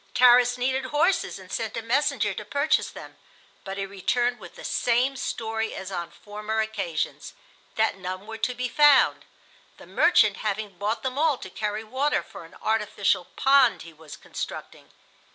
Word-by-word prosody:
Tarras 245 0 +6
needed 260 +1 0
horses 310 - +1
and 185 -1 -13
sent 225 -1 -3
a - - -2
messenger 265 +6 +1
to - - -6
purchase 285 +2 +1
them, - - -11 0.5
but 195 0 -6
he 195 - -2
returned 240 +5 -1
with 175 -4 -12
the - - -11
same 250 +3 +1
story 225 -3 -3
as 190 0 -7
on 175 -2 -4
former 210 +3 -5
occasions—that 220 - -3
none 185 +1 -6
were 225 +1 -8
to 245 +3 -1
be 250 +1 -2
found, 290 +1 +5 0.5
the - - -13
"merchant" - - +4
having 210 -2 -3
bought 210 +3 -2
them 260 +1 -2
all 310 -3 +3
to 190 - -10
carry 210 0 -3
water 265 +6 0
for - - -11
an 165 - -16
artificial 205 -4 +1
pond 270 -2 +4
he 165 - -12
was 155 -1 -12
constructing. - - -7
220 Hz, 165 wpm, -25 LUFS, 200-255 Hz, 0.5 s, Tarras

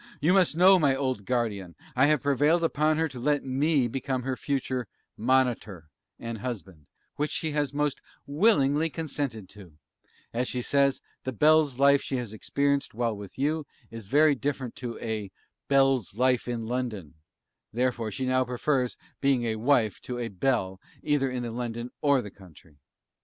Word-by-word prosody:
You 155 +5 +3
must 185 -5 +3
know, 185 +2 +7
my 140 -4 +3
old 130 -7 -2
Guardian, 105 -8 -2 0.2
I 130 +3 +5
have 150 -2 +2
prevailed 145 +5 +3
upon 155 -1 +2
her 160 0 +1
to 130 -5 -9
let 145 +3 +1
me 135 0 +2
become 130 +1 -3
her 130 0 -2
future 130 -3 -2 0.3
'MONITOR' 115 -9 0 0.3
and 115 -1 -6
Husband, 95 - -7 0.3
which 150 +1 0
she 160 - -1
has 145 -2 0
most 145 -1 -1 0.2
willingly 150 -2 +3
consented 140 - -4
to; 95 -6 -14 0.6
as 125 +2 -1
she 125 -1 -3
says 140 0 +2 0.2
the 130 - -3
Belle's 150 +1 +3
life 140 +1 +5
she 135 - -3
has 120 -4 -5
experienced 140 +4 -1
while 115 -2 0
with 100 -2 -10
you, 150 +2 -1 0.2
is 115 -3 -9
very 150 +5 +5
different 135 -2 -3
to 120 -2 -5
a 110 -3 -4 0.4
'BELLE'S 135 -7 +2
LIFE 125 +1 +2
IN 120 -2 -3
LONDON;' 110 - -4 0.6
therefore 120 -1 -1
she 130 +4 -3
now 130 0 +2
prefers 125 +1 -1 0.2
being 135 -3 +2
a 110 -1 -1
Wife 115 -4 +2
to 125 - -5
a 120 -1 -3
'Belle,' 95 -3 -1 0.2
either 145 -3 +1
in 125 -1 -3
London 120 0 -4
or 140 -4 +3
the 105 - -8
Country. 85 -6 -18
130 Hz, 165 wpm, -27 LUFS, 115-145 Hz, 0.6 s, know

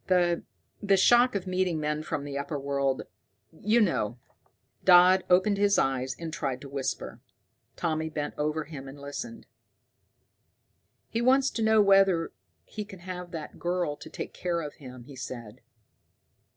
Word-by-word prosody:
The 175 -2 +3 0.4
the 200 -2 +3
shock 240 +5 +5
of 195 -2 -2
meeting 185 -3 0
men 150 0 -1
from 150 -2 -3
the 145 -1 -6
upper 140 +2 -3
world, 140 -1 -1 0.5
you 210 +8 +1
know." 125 - +1 0.7
Dodd 185 +1 +7
opened 190 +3 +4
his 200 0 +4
eyes 130 -1 0
and 165 -2 -6
tried 135 -4 -2
to 140 - -9
whisper. 135 -1 -4 0.5
Tommy 160 -2 -1
bent 150 -2 -4
over 150 +1 -1
him 145 -3 -9
and 135 +2 -10
listened. 230 +12 -7 1.6
"He 230 - -2
wants 265 +2 +4
to 230 - -3
know 220 -1 +5
whether 195 -4 +4 0.3
he 210 - -6
can 195 -3 -12
have 180 -1 -6
that 160 -3 -8
girl 175 -4 -1
to - - -11
take - - -6
care 175 -2 -2
of 150 -2 -6
him," 125 -3 -11
he 135 +2 -12
said. 120 -2 -8
165 Hz, 155 wpm, -28 LUFS, 140-190 Hz, 1.6 s, Dodd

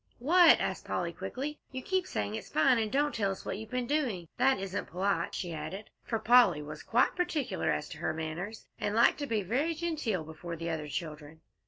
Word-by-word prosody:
"What?" 335 +6 +6
asked - - -2
Polly, - - -2
quickly. 295 +4 -5
"You 260 -1 -5
keep 375 -1 0
saying 105 0 -2
it's 110 - -6
fine, 190 +10 +4
and 215 -1 -1
don't 290 +3 +2
tell 205 -3 0
us 195 - -5
what 195 - -3
you've 220 0 -8
been 250 0 -1
doing. 235 - -1
That 265 +2 +4
isn't 195 0 -4
polite," 195 +3 -1
she 175 -2 -3
added, 160 +7 -6
for 225 - -1
Polly 220 -9 +5
was 150 +1 -8
quite 240 +3 +2
particular 350 -5 -1
as - - 0
to - - -9
her - - 0
manners, 160 +7 -5
and 205 +1 -1
liked 235 +5 +5
to 285 - -3
be 220 -4 0
very 275 - 0
genteel 305 - -1
before 160 +2 -7
the 165 +1 -3
other 155 -2 -3
children. 155 0 -6
210 Hz, 210 wpm, -31 LUFS, 165-265 Hz, -, What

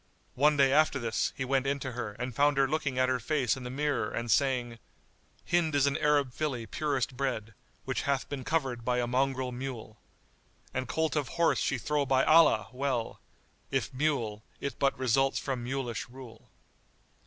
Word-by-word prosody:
One 150 +2 +3
day 135 -1 +4
after 155 -1 +4
this, 115 -4 -1
he 130 - -2
went 135 +1 +1
in 140 +1 +1
to 130 - -4
her 115 -4 -5
and 125 +3 -5
found 145 +3 +3
her 135 0 +4
looking 140 -3 -1
at 130 0 +3
her 130 -1 +1
face 130 0 0
in 130 - -8
the 125 - -6
mirror 145 +2 -1
and 115 -1 -3
saying, 125 -4 +1 0.7
"Hind 165 -3 +2
is 140 -1 +4
an 140 0 +1
Arab 145 -4 +2
filly 130 -7 -2
purest 135 -1 -2
bred, 125 -5 -2 0.2
* - - -36
Which - - -1
hath 140 -1 -1
been 140 -3 -5
covered 130 -7 -1
by 125 +1 0
a 120 - +1
mongrel 130 +1 0
mule; 120 -4 -7 0.7
An 130 -1 -2
colt 160 +7 0
of 145 -3 0
horse 170 -1 +3
she 135 - 0
throw 145 +3 -1
by 130 0 +3
Allah! 155 -11 +5
well; 130 -3 -2 0.3
* - - -38
If 135 -2 -1
mule, 125 -7 -1 0.2
it 140 - -5
but 140 -1 +2
results 130 +1 +2
from 130 -3 -3
mulish 125 -2 -3
rule." 120 -2 -13
130 Hz, 190 wpm, -30 LUFS, 125-140 Hz, 0.7 s, Allah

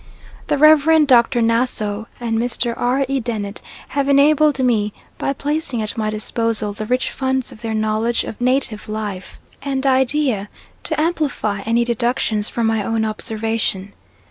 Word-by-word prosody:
The 295 - +1
Rev. 310 +1 +6
Dr. 240 -2 +4
Nassau 225 -2 0
and 230 -2 -1
Mr. 240 0 -1
R. 255 +3 +1
E. 270 0 0
Dennett 215 -4 -4 0.3
have 280 0 -1
enabled 295 +1 +4
me, 225 -6 +1 0.3
by - - 0
placing 280 -4 -2
at 215 - -5
my 215 -2 -1
disposal 215 0 -1
the 215 +1 -6
rich 250 +2 0
funds 265 -1 -1
of 215 - -13
their 225 -1 -3
knowledge 220 +2 0
of 220 - -8
native 250 -4 0
life 210 -4 -5 0.2
and 270 -1 -2
idea, 260 -5 +1 0.4
to 315 -2 -1
amplify 300 -10 -1
any 235 +1 +3
deductions 235 -2 0
from 235 - -1
my 225 -1 +1
own 225 +1 0
observation. 215 -2 -2
235 Hz, 150 wpm, -19 LUFS, 215-270 Hz, 0.4 s, Rev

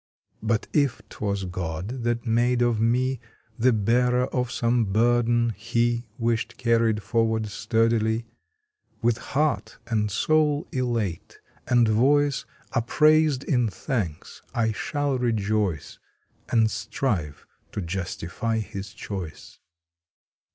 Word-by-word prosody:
But 110 0 0
if 140 -5 +1
twas 100 -2 -2
God 90 +6 -4
that 120 +1 -1
made 120 +1 +2
of 120 -2 +1
me 125 +3 +1 0.4
The 125 +3 +5
bearer 125 +3 +2
of 125 -1 0
some 120 -1 +1
burden 120 +3 +2
He 120 +2 -1
Wished 115 0 -1
carried 115 -3 +2
forward 115 -1 +1
sturdily, 115 +1 +1 0.8
With 115 -1 +2
heart 150 +2 -1
and 110 -3 0
soul 150 - +2
elate, 115 -9 -2 0.3
and 120 -2 +4
voice 140 +6 +3 0.3
Upraised 150 +3 +3
in 125 -5 +1
thanks, 100 - -4
I 115 -1 +2
shall 140 +4 -1
rejoice 105 - -1 0.5
And 110 -2 +3
strive 85 - -2 0.3
to - - -4
justify 95 +4 -3
His 100 -2 -6
choice! 95 -6 -7
115 Hz, 110 wpm, -25 LUFS, 105-125 Hz, 0.8 s, The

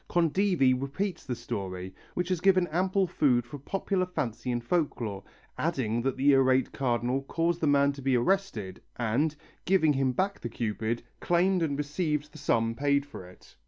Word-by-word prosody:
Condivi 170 -4 +3
repeats 145 +9 -3
the 125 - -2
story, 95 -6 -5 0.2
which 180 0 -1
has 180 -3 0
given 185 -1 +4
ample 185 +4 +1
food 130 -8 +2
for 130 +4 -9
popular 185 +4 -1
fancy 125 -8 -3
and 120 -1 -2
folklore, 120 - -1 0.4
adding 120 -8 0
that 135 +1 -1
the 140 +2 +4
irate 130 -1 +3
Cardinal 125 0 0
caused 165 +4 -1
the 155 - +2
man 140 0 +4
to 140 0 -9
be 130 -1 +2
arrested 120 - -1
and, 125 +7 0 0.3
giving 170 -5 +3
him 135 -1 +1
back 195 +9 -1
the 120 - -5
Cupid, 115 0 -2 0.2
claimed 180 +1 +2
and 145 -4 0
received 150 0 -2
the 155 - -12
sum 115 -5 +1
paid 140 +2 +1
for 95 -10 -10
it. 90 - -19
140 Hz, 170 wpm, -28 LUFS, 120-170 Hz, 0.4 s, given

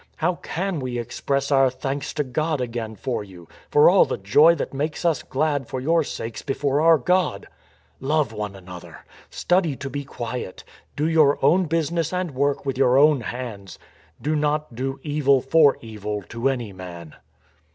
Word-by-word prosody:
How 175 +2 -1
can 185 -1 -3
we 125 -2 -4
express 140 +4 -2
our 135 -1 +5
thanks 135 +2 -4
to 150 - 0
God 155 +3 -1
again 115 -3 -4
for 120 -2 -3
you, 90 -4 -14 0.2
for 150 - +6
all 185 +2 +7
the - - -3
joy 145 +13 +5
that 145 - -4
makes 150 +5 -3
us 160 -6 +2
glad 145 -2 -1
for, 130 - -4
your 165 +5 +2
sakes 115 -5 -6
before 140 +1 0
our 165 0 +6
God?... 180 - 0 0.5
Love 145 -3 0
one 105 -2 -5
another. 90 -2 -11 0.2
Study 175 -5 +1
to 135 +1 -7
be 140 +2 -4
quiet. 120 -6 -6 0.3
Do 150 +2 0
your 155 -3 +4
own 180 +6 +4
business 165 0 -1
and 180 -2 -2
work 140 +2 -1
with 135 -1 -2
your 130 -1 +4
own 145 -1 +5
hands.... 110 -3 -7 0.4
Do 155 +2 -1
not 150 -2 -1
do 135 +3 -4
evil 145 -3 +2
for 145 +1 +4
evil 105 -2 -5
to 115 +4 0
any 120 -6 -3
man." 85 -3 -10
140 Hz, 170 wpm, -23 LUFS, 120-155 Hz, 0.5 s, all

